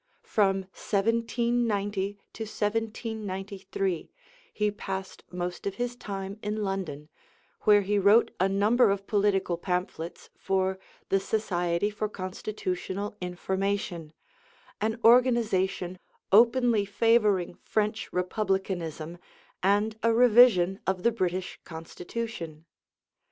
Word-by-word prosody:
From 195 Hz, -2 st, +2 dB
1790 220 Hz, -2 st, 0 dB, 0.2 s
to 225 Hz, -, -5 dB
1793 205 Hz, -4 st, -3 dB, 0.4 s
he 210 Hz, 0 st, 0 dB
passed 195 Hz, -1 st, -6 dB
most 180 Hz, +1 st, -4 dB
of 195 Hz, -, -3 dB
his 245 Hz, +2 st, -2 dB
time 195 Hz, -2 st, -6 dB
in 210 Hz, +1 st, -2 dB
London, 185 Hz, -7 st, -3 dB, 0.6 s
where 210 Hz, -1 st, +7 dB
he 205 Hz, +1 st, +1 dB
wrote 205 Hz, +4 st, +5 dB
a 190 Hz, +2 st, +3 dB
number 210 Hz, +4 st, +4 dB
of 195 Hz, 0 st, -1 dB
political 195 Hz, -4 st, +1 dB
pamphlets 180 Hz, -2 st, -4 dB
for 190 Hz, 0 st, 0 dB, 0.3 s
the 195 Hz, -, +3 dB
Society 185 Hz, -2 st, 0 dB
for 210 Hz, 0 st, -3 dB
Constitutional 190 Hz, 0 st, -4 dB
Information, 180 Hz, -2 st, -2 dB, 0.7 s
an 220 Hz, +2 st, -1 dB
organization 220 Hz, -7 st, +3 dB, 0.3 s
openly 235 Hz, 0 st, +5 dB
favoring 205 Hz, -3 st, +2 dB
French 215 Hz, +1 st, -1 dB
Republicanism 180 Hz, -4 st, -2 dB, 0.4 s
and 205 Hz, +3 st, +2 dB
a 230 Hz, -, +3 dB
revision 225 Hz, -6 st, +6 dB
of 190 Hz, -1 st, 0 dB
the 235 Hz, -, +4 dB
British 185 Hz, -4 st, -2 dB
Constitution. 165 Hz, 0 st, -6 dB
200 Hz, 100 wpm, -28 LUFS, 185-220 Hz, 0.7 s, where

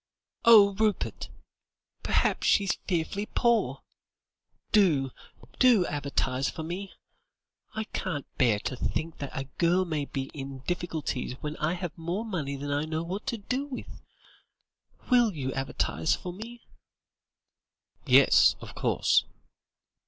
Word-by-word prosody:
"Oh, 210 Hz, -4 st, +8 dB
Rupert! 215 Hz, +1 st, -1 dB, 0.7 s
perhaps -, -, +1 dB
she's 200 Hz, -2 st, +3 dB
fearfully 190 Hz, +3 st, -1 dB
poor. 235 Hz, -1 st, +1 dB, 0.9 s
Do, 155 Hz, -, +3 dB, 0.5 s
do 240 Hz, -8 st, +5 dB
advertise 140 Hz, -2 st, -1 dB
for 160 Hz, -, -6 dB
me. 185 Hz, +4 st, -5 dB, 0.8 s
I 220 Hz, -, -1 dB
can't 165 Hz, -8 st, -4 dB
bear 120 Hz, -5 st, +4 dB
to 130 Hz, -, -3 dB
think 160 Hz, +6 st, -3 dB
that 140 Hz, -, -4 dB
a 135 Hz, -, -4 dB, 0.2 s
girl 175 Hz, +2 st, +3 dB
may 155 Hz, -4 st, -2 dB
be 135 Hz, -1 st, -5 dB
in 135 Hz, -2 st, -7 dB
difficulties 160 Hz, -8 st, -3 dB
when 150 Hz, 0 st, -4 dB
I 155 Hz, +3 st, 0 dB
have 175 Hz, -2 st, -5 dB
more 175 Hz, +6 st, -3 dB
money 155 Hz, -10 st, -3 dB
than 145 Hz, +1 st, -5 dB
I 145 Hz, +1 st, 0 dB
know 160 Hz, +1 st, -2 dB
what 190 Hz, +8 st, -5 dB
to 240 Hz, -3 st, -1 dB
do 255 Hz, +7 st, -3 dB
with. 265 Hz, -3 st, -8 dB, 1.1 s
Will 240 Hz, -4 st, +5 dB
you 130 Hz, -3 st, -3 dB
advertise 135 Hz, +3 st, 0 dB
for 180 Hz, -, -7 dB
me?" 230 Hz, +5 st, -10 dB, 1.4 s
"Yes; -, -, +6 dB
of -, -, -10 dB
course." -, -, +2 dB
170 Hz, 130 wpm, -28 LUFS, 145-205 Hz, 1.4 s, Oh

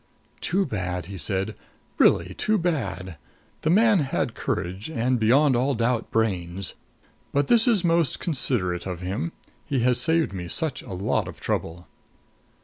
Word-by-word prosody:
"Too 195 Hz, +3 st, 0 dB
bad!" 90 Hz, -, -3 dB
he 100 Hz, +2 st, -8 dB
said. 95 Hz, +7 st, -1 dB, 0.5 s
"Really 90 Hz, +2 st, +4 dB
too 215 Hz, -, +1 dB
bad! 95 Hz, -, -2 dB, 0.4 s
The 155 Hz, -, 0 dB
man 210 Hz, +2 st, +5 dB
had 140 Hz, -3 st, -1 dB
courage 95 Hz, -, -3 dB
and, 125 Hz, -3 st, 0 dB
beyond 130 Hz, +5 st, +4 dB
all 130 Hz, +3 st, +1 dB
doubt, 115 Hz, 0 st, 0 dB
brains. 95 Hz, -5 st, -1 dB, 0.6 s
But 140 Hz, 0 st, +1 dB
this 235 Hz, +1 st, +6 dB
is 215 Hz, -6 st, +3 dB
most 165 Hz, -5 st, +2 dB
considerate 105 Hz, -, 0 dB
of 90 Hz, -1 st, -5 dB
him. 100 Hz, -, -3 dB, 0.4 s
He 135 Hz, -5 st, 0 dB
has 125 Hz, 0 st, +2 dB
saved 160 Hz, -2 st, +2 dB
me 90 Hz, -2 st, -5 dB
such 155 Hz, -, 0 dB
a 95 Hz, -, -9 dB
lot 90 Hz, +2 st, 0 dB
of -, -, -9 dB
trouble." 85 Hz, +2 st, -3 dB
120 Hz, 150 wpm, -25 LUFS, -, 0.6 s, this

